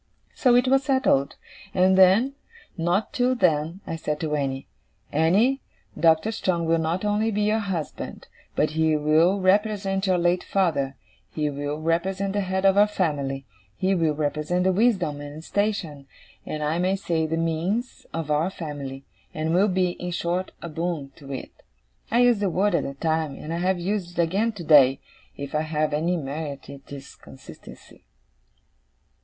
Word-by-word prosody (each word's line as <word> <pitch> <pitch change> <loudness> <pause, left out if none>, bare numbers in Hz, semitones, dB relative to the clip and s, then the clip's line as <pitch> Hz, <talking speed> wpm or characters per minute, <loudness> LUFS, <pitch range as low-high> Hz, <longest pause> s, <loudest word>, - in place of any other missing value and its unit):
So 250 -3 +3
it 245 +1 +4
was 270 +1 +3
settled. 260 - +2 0.4
And 185 +1 +4
then, 190 +4 +6 0.5
and 165 -3 -4
not 180 +5 0
till 255 +1 +2
then, 165 -3 +1
I - - -4
said 150 -1 -3
to 155 -2 -2
Annie, 135 -2 -2 0.5
"Annie, 200 - +3 0.3
Doctor 165 +5 +3
Strong 180 -6 -1
will 165 0 +2
not 165 +5 -1
only 210 +2 +1
be 210 -1 0
your 215 +1 +2
husband, 190 -7 -5 0.3
but 150 - +1
he 160 0 +2
will 155 +6 +3
represent 195 0 +1
your 185 -1 +3
late 175 +1 +1
father: 145 -8 0 0.3
he 150 -1 -2
will 145 +1 -4
represent 190 +5 -1
the 205 - 0
head 190 0 -1
of 195 0 +5
our 205 - +6
family, 140 -9 -2 0.3
he 190 +1 +1
will 165 -4 +1
represent 155 +4 -1
the 190 - +3
wisdom 185 -8 +1
and 145 +2 -8
station, 170 -9 -2 0.4
and 150 0 -3
I 155 +3 0
may 185 +2 +1
say 165 -4 -1
the 165 +1 -1
means, 170 +9 -2
of 160 -2 -4
our 155 +4 +2
family; 140 -6 -7 0.3
and 160 +1 -1
will 190 +4 +4
be, 185 -2 +1
in 180 0 -6
short, 175 +1 -2
a 170 - -5
Boon 160 -3 -3
to 140 -3 -11
it." 135 - -6 0.6
I 235 +2 +3
used 245 -3 +4
the 200 -2 +1
word 195 +3 +1
at - - +2
the 140 - -5
time, 160 -1 -1
and 160 - -6
I - - -2
have 185 +2 +1
used 175 -1 -3
it 170 - +4
again, 200 +8 0
today. 150 -8 +5 0.4
If 140 0 -6
I 150 - +1
have 155 -1 -1
any 170 +4 +1
merit 140 -1 -5
it 140 -1 -13
is 140 -1 -9
consistency. 70 -2 -14
170 Hz, 175 wpm, -24 LUFS, 150-195 Hz, 0.6 s, then